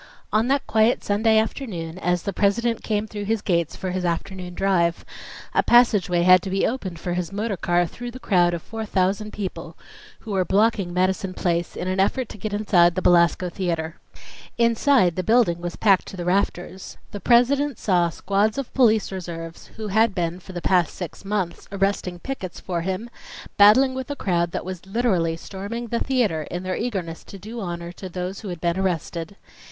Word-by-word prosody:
On 220 +2 +3
that 275 +1 +1
quiet 220 +2 +2
Sunday 220 +2 +2
afternoon, 185 -7 -2
as 180 -2 0
the 200 - -3
President 230 +4 +1
came 210 -1 -1
through 205 -1 -6
his 220 0 -1
gates 170 -4 0
for 185 - -4
his 185 0 -2
afternoon 180 +1 -3
drive, 175 -3 +1 0.5
a - - +4
passageway 205 -8 +4
had 185 0 +7
to 195 - -5
be 195 +1 +1
opened 195 -8 -3
for 175 +1 -3
his 180 0 -3
motor 205 +1 -2
car 175 0 +1
through 245 +8 -7
the 250 +2 -9
crowd 175 -7 +2
of 165 - -7
four 225 -1 -6
thousand 205 +1 0
people 195 -3 -6 0.4
who 220 - -8
were 190 -2 +2
blocking 200 -1 +2
Madison 185 +1 0
Place 170 -1 -1
in 180 - -4
an 185 +1 -1
effort 230 +5 +1
to 210 - -10
get 215 +3 -4
inside 180 -5 +3
the 185 - -1
Belasco 175 +1 +4
Theatre. 165 -3 -3 0.6
Inside 235 - +3
the - - +1
building 205 -5 +2
was 175 -1 -4
packed 195 -4 +3
to 190 - -8
the 175 - -4
rafters. 185 0 -2
The 205 - -6
President 265 +6 +3
saw 175 -4 +2
squads 200 +7 0
of 275 -3 -4
police 220 -6 +3
reserves, 165 -3 -7
who 220 -1 -5
had 220 +1 +3
been 175 0 -2
for 185 - -12
the 175 -1 -6
past 180 -3 +2
six 180 +1 -7
months 195 -4 -3
arresting 195 -2 -1
pickets 190 -4 -6
for 175 -2 -3
him, 190 +6 -3 0.5
battling 230 +6 +6
with 260 +1 -5
a 285 - -3
crowd 175 -8 0
that - - -4
was 185 -2 -6
literally 190 -7 +1
storming 210 +7 -6
the 235 - 0
theatre 215 - 0
in 175 +1 -4
their 185 0 -2
eagerness 190 -9 -4
to 195 - -10
do 220 +5 -8
honor 170 -2 -5
to 185 +1 -9
those 180 +2 -4
who 210 - -8
had 175 -3 -5
been 170 +2 0
arrested. 175 -1 -2
190 Hz, 195 wpm, -23 LUFS, 175-220 Hz, 0.6 s, had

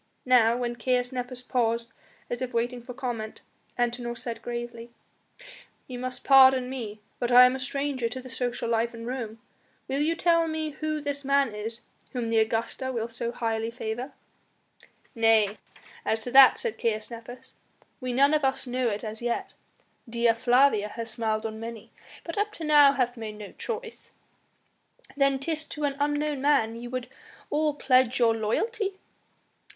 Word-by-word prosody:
Now, 240 -2 +5
when 240 -1 -3
Nepos 250 0 -1
paused 235 -1 0 0.3
as 240 +1 -4
if 250 -2 -4
waiting 240 +1 -1
for 245 +1 -9
comment, 235 -5 -5 0.4
Antinor 240 0 -1
said 235 -1 -4
gravely: 240 -1 -6 1.0
"Ye 255 - -8
must 255 +1 -5
pardon 260 -2 +6
me, 215 -5 -6 0.2
but 240 0 -1
I 250 +1 +10
am 250 +1 +3
a - - -5
stranger 270 -2 -1
to 260 - -6
the 255 - -10
social 240 0 -2
life 230 +1 0
in 230 0 -8
Rome. 235 -3 -4 0.5
Will 270 +1 -1
you 325 +3 +1
tell 335 -1 +3
me 315 -1 -2
who 310 +1 -3
this 285 -1 -3
man 275 -3 +2
is 225 +3 -5 0.3
whom 240 -3 -2
the 225 - +4
Augusta 230 +4 -1
will 230 -2 -3
so 230 +1 -4
highly 225 -1 -2
favour?" 240 +3 -5 1.0
"Nay, 225 -3 +3 0.5
as 220 0 0
to 245 - -4
that," 265 0 +8
said 470 -3 -4
Caius 215 -1 -1
Nepos, 235 +2 -10 0.5
"we 255 -1 -3
none 280 +4 +4
of 305 -1 +2
us 265 0 0
know 250 -1 0
it 210 +1 -4
as 220 0 -6
yet! 240 0 -2 0.6
Dea 235 0 +3
Flavia 240 -2 +3
has 225 +1 -6
smiled 220 -2 -1
on 220 0 -4
many, 230 -1 -8 0.3
but 335 +3 -4
up 420 +1 0
to 335 - -8
now 295 -2 +6
hath 250 -3 0
made 215 -2 -6
no 210 -1 -9
choice." 465 0 -7 1.0
"Then 275 -1 +3
'tis 315 +3 -3
to 300 - -6
an 280 -1 0
unknown 290 -1 0
man 270 -6 +2
ye 235 +1 -7
would 250 0 -4 0.4
all 300 -1 +1
pledge 255 -3 +3
your 230 -2 +4
loyalty?" 390 - -1
245 Hz, 165 wpm, -27 LUFS, 230-275 Hz, 1.0 s, I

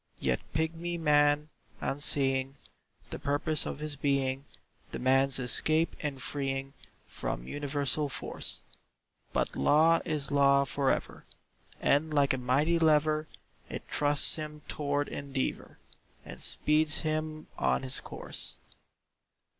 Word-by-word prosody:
Yet 65 -2 0
pigmy 165 +3 -2
man, 150 -1 +3 0.3
unseeing 135 -1 0 0.6
The - - -5
purpose 145 +2 0
of - - -4
his 150 0 -2
being, 140 -1 0 0.5
Demands 135 +1 +3
escape 155 +6 +2
and 145 -3 -3
freeing 135 0 -3 0.3
From - - -4
universal 145 0 -1
force. 120 -3 -4 0.7
But - - -1
law 160 - +4
is 150 -4 -1
law 140 -1 +5
for 135 0 0
ever, - - -2 0.5
And 150 +3 +2
like 145 -2 +3
a 130 - -2
mighty 145 +7 +2
lever 155 -1 +3 0.4
It - - -6
thrusts 145 +1 +4
him 150 -1 -7
tow'rd 145 -1 -1
endeavour, 140 -2 -4 0.5
And - - -9
speeds 155 +1 +2
him 155 0 -3
on - - +1
his 130 0 -1
course. - - -5
145 Hz, 115 wpm, -30 LUFS, 135-155 Hz, 0.7 s, law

